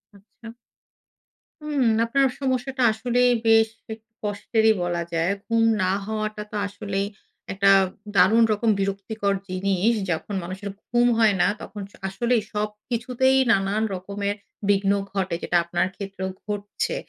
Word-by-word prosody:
আচ্ছা। 225 Hz, +3 st, -14 dB, 1.1 s
হুম, 290 Hz, -4 st, 0 dB, 0.2 s
আপনার 275 Hz, +3 st, +3 dB
সমস্যাটা 260 Hz, -1 st, -1 dB
আসলেই 245 Hz, +3 st, +2 dB, 0.2 s
বেশ 225 Hz, 0 st, +5 dB, 0.2 s
একটু 220 Hz, +1 st, -15 dB
কষ্টেরই 220 Hz, +2 st, +2 dB
বলা 175 Hz, -1 st, -1 dB
যায়। 165 Hz, +3 st, +1 dB, 0.2 s
ঘুম 230 Hz, -1 st, +2 dB, 0.2 s
না 185 Hz, -, +2 dB
হওয়াটা 215 Hz, -1 st, -3 dB
তো -, -, -7 dB
আসলেই 200 Hz, -1 st, -3 dB, 0.5 s
একটা 195 Hz, 0 st, +4 dB, 0.4 s
দারুণ 215 Hz, +6 st, +6 dB
রকম 220 Hz, +2 st, 0 dB
বিরক্তিকর 200 Hz, +1 st, -1 dB, 0.2 s
জিনিস। 195 Hz, +4 st, +1 dB, 0.2 s
যখন 165 Hz, +5 st, -3 dB
মানুষের 190 Hz, +3 st, -6 dB, 0.2 s
ঘুম 240 Hz, +1 st, +3 dB
হয় 215 Hz, -3 st, +4 dB
না -, -, +4 dB
তখন 205 Hz, -1 st, -8 dB
স -, -, -26 dB
আসলেই 235 Hz, +3 st, +1 dB
সবকিছুতেই 235 Hz, +5 st, 0 dB
নানান 200 Hz, +2 st, +1 dB
রকমের 200 Hz, +2 st, -3 dB, 0.3 s
বিঘ্ন 200 Hz, 0 st, +3 dB, 0.2 s
ঘটে। 190 Hz, -3 st, -1 dB
যেটা 175 Hz, -, +2 dB
আপনার 175 Hz, +1 st, 0 dB
ক্ষেত্রেও 195 Hz, -1 st, -5 dB, 0.2 s
ঘটছে। 205 Hz, -1 st, -3 dB
210 Hz, 130 wpm, -24 LUFS, 195-230 Hz, 1.1 s, দারুণ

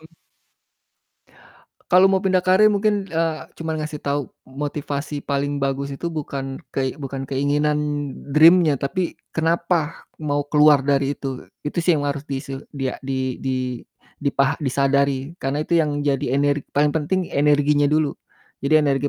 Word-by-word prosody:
Mhm. 160 Hz, -, -16 dB, 1.8 s
Kalau 180 Hz, +1 st, +7 dB
mau 190 Hz, 0 st, +4 dB
pindah 185 Hz, -1 st, +1 dB
karir 190 Hz, +3 st, +6 dB
mungkin, 205 Hz, -1 st, +1 dB
eee, 165 Hz, -1 st, -2 dB
cuman 160 Hz, -1 st, -3 dB
ngasih 150 Hz, 0 st, -4 dB
tau 140 Hz, -1 st, -1 dB, 0.2 s
motivasi 145 Hz, +1 st, -4 dB
paling 140 Hz, 0 st, -1 dB
bagus 140 Hz, 0 st, -1 dB
itu 155 Hz, +5 st, -5 dB
bukan 135 Hz, -3 st, -5 dB
kei 130 Hz, -1 st, -1 dB
bukan 135 Hz, -1 st, -5 dB
keinginan 145 Hz, +3 st, +1 dB, 0.5 s
dream-nya 160 Hz, +1 st, +6 dB
tapi 170 Hz, +7 st, -2 dB, 0.2 s
kenapa 165 Hz, -1 st, 0 dB, 0.2 s
mau 145 Hz, -1 st, -1 dB
keluar 150 Hz, -1 st, +5 dB
dari 140 Hz, 0 st, +1 dB
itu. 135 Hz, -2 st, -6 dB, 0.2 s
Itu 150 Hz, +4 st, -1 dB
sih 170 Hz, -1 st, +3 dB
yang 145 Hz, -, -2 dB
harus 145 Hz, 0 st, -3 dB
dise 135 Hz, 0 st, -5 dB, 0.2 s
di 135 Hz, -, -3 dB
a -, -, -9 dB
di 130 Hz, -1 st, -3 dB
di 130 Hz, -1 st, -1 dB, 0.7 s
dipah 140 Hz, +1 st, +1 dB
disadari. 140 Hz, 0 st, +1 dB
Karena 140 Hz, +3 st, -1 dB
itu 170 Hz, +1 st, +3 dB
yang 145 Hz, -2 st, -1 dB
jadi 135 Hz, -2 st, 0 dB
ener 145 Hz, +1 st, +2 dB, 0.2 s
paling 145 Hz, 0 st, +3 dB
penting 160 Hz, +4 st, 0 dB
energinya 145 Hz, 0 st, +3 dB
dulu, 155 Hz, -1 st, +2 dB, 0.5 s
jadi 155 Hz, +2 st, +3 dB
energi 140 Hz, 0 st, +1 dB
145 Hz, 150 wpm, -22 LUFS, 140-160 Hz, 1.8 s, Kalau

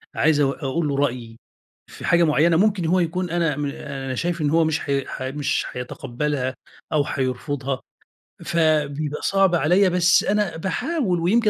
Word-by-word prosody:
عايز 155 Hz, -1 st, +3 dB
أق 140 Hz, +2 st, 0 dB
أقول 150 Hz, +4 st, -1 dB
له 140 Hz, -, -1 dB
رأيي 120 Hz, -5 st, -2 dB, 0.5 s
في -, -, -9 dB
حاجة 170 Hz, 0 st, +4 dB
مُعيّنة 160 Hz, +2 st, +3 dB
ممكن 195 Hz, -3 st, +2 dB
هو 180 Hz, +3 st, +2 dB
يكون 180 Hz, +1 st, -1 dB
أنا 165 Hz, -4 st, 0 dB
م 145 Hz, -, -2 dB
أنا 135 Hz, -2 st, -5 dB
شايف 170 Hz, +4 st, -2 dB
إن 145 Hz, -, +1 dB
هو 165 Hz, +1 st, +3 dB
مش 160 Hz, 0 st, 0 dB
حي 140 Hz, -2 st, -1 dB
ح -, -, -7 dB
مش 140 Hz, +2 st, -1 dB
حيتقبلها 130 Hz, +2 st, -3 dB, 0.4 s
أو 150 Hz, -2 st, +3 dB
حيرفضها، 130 Hz, 0 st, -3 dB, 0.6 s
فبيبقى 150 Hz, -2 st, 0 dB
صعب 195 Hz, -2 st, +3 dB
عليَّ 180 Hz, +5 st, +3 dB
بس 175 Hz, 0 st, +4 dB
أنا 205 Hz, -4 st, 0 dB
باحاول 215 Hz, -, -1 dB
ويمكن 215 Hz, +6 st, +3 dB
155 Hz, 160 wpm, -22 LUFS, 140-175 Hz, 0.6 s, حاجة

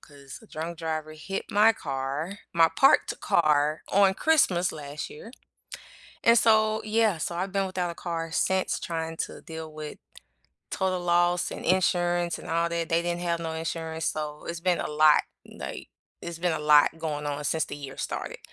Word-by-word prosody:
'cause 140 Hz, -2 st, -12 dB
a -, -, -16 dB
drunk 165 Hz, 0 st, -6 dB
driver 155 Hz, -1 st, -3 dB
hit 165 Hz, +5 st, -6 dB
my 215 Hz, +2 st, +5 dB
car- 140 Hz, +7 st, -4 dB, 0.2 s
my 165 Hz, -1 st, +6 dB
parked 270 Hz, -, +4 dB
car- 150 Hz, -1 st, +2 dB
on 195 Hz, -1 st, +4 dB
Christmas, 190 Hz, -, +2 dB
last 145 Hz, -1 st, -7 dB
year, 225 Hz, +10 st, -11 dB, 0.9 s
and 230 Hz, 0 st, +6 dB
so 220 Hz, -1 st, +4 dB
yeah, 215 Hz, -4 st, +2 dB
so 170 Hz, +2 st, -3 dB
I've 185 Hz, +2 st, -3 dB
been 195 Hz, -1 st, +1 dB
without 185 Hz, -2 st, -2 dB
a -, -, -7 dB
car 165 Hz, -2 st, -4 dB
since, 190 Hz, +2 st, 0 dB
trying 165 Hz, -1 st, -4 dB
to -, -, -4 dB
deal 160 Hz, -1 st, -8 dB
with 155 Hz, -1 st, -8 dB, 0.7 s
total 185 Hz, -1 st, -1 dB
loss 175 Hz, 0 st, +2 dB
and -, -, -7 dB
insurance, 175 Hz, -1 st, +1 dB
and -, -, -10 dB
all 170 Hz, +1 st, +1 dB
that. 170 Hz, -1 st, -2 dB
They 165 Hz, +1 st, +2 dB
didn't 175 Hz, 0 st, -2 dB
have 170 Hz, -1 st, -1 dB
no 165 Hz, -1 st, -3 dB
insurance, 160 Hz, 0 st, -4 dB
so 150 Hz, -1 st, -4 dB
it's 170 Hz, 0 st, -4 dB
been 180 Hz, -1 st, +1 dB
a -, -, -3 dB
lot, 150 Hz, 0 st, +5 dB, 0.2 s
n -, -, -15 dB
like, -, -, -7 dB, 0.3 s
it's 170 Hz, -1 st, -6 dB
been 180 Hz, 0 st, 0 dB
a 160 Hz, -, -1 dB
lot 150 Hz, +1 st, +5 dB
going 150 Hz, -2 st, -3 dB
on 145 Hz, 0 st, -3 dB
since 160 Hz, +2 st, +1 dB
the -, -, -7 dB
year 140 Hz, -2 st, -8 dB
started, -, -, -4 dB
170 Hz, 185 wpm, -27 LUFS, 155-180 Hz, 0.9 s, my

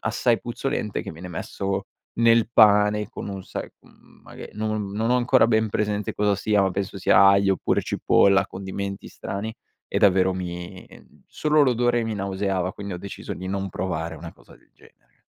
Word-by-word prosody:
assai 120 Hz, -2 st, +1 dB
puzzolente, 120 Hz, -3 st, -3 dB
che -, -, -7 dB
viene 85 Hz, +3 st, -9 dB
messo 95 Hz, +3 st, -4 dB, 0.3 s
nel 115 Hz, -1 st, +4 dB
pane 105 Hz, -2 st, +4 dB
con -, -, -7 dB
un 100 Hz, -1 st, -6 dB
sai, -, -, -6 dB
uhm, -, -, -23 dB
maghe -, -, -11 dB
non 110 Hz, -1 st, -3 dB
non 110 Hz, +3 st, -1 dB
ho 125 Hz, -, +4 dB
ancora 125 Hz, 0 st, +4 dB
ben 110 Hz, -1 st, +2 dB
presente 105 Hz, 0 st, -2 dB
cosa 105 Hz, -1 st, +1 dB
sia, 100 Hz, +1 st, +1 dB
ma 95 Hz, -, +1 dB
penso 95 Hz, +1 st, -4 dB
sia 100 Hz, +1 st, +5 dB
aglio 100 Hz, 0 st, +4 dB
oppure -, -, 0 dB
cipolla, 100 Hz, -1 st, +3 dB
condimenti 100 Hz, +1 st, -6 dB
strani, 105 Hz, +3 st, -5 dB, 0.3 s
e -, -, -1 dB
davvero 95 Hz, -1 st, +4 dB
mi 90 Hz, -1 st, -6 dB, 0.4 s
solo 150 Hz, -1 st, +2 dB
l'odore 120 Hz, -2 st, +2 dB
mi 110 Hz, -1 st, -3 dB
nauseava, 95 Hz, -2 st, -2 dB
quindi 100 Hz, -2 st, -7 dB
ho -, -, -6 dB
deciso 100 Hz, +2 st, -7 dB
di 95 Hz, -, -7 dB
non 95 Hz, 0 st, -2 dB
provare 85 Hz, -3 st, -4 dB
una 80 Hz, +2 st, -9 dB
cosa -, -, -19 dB
del -, -, -29 dB
genere. -, -, -25 dB
100 Hz, 175 wpm, -24 LUFS, 95-110 Hz, 0.4 s, sia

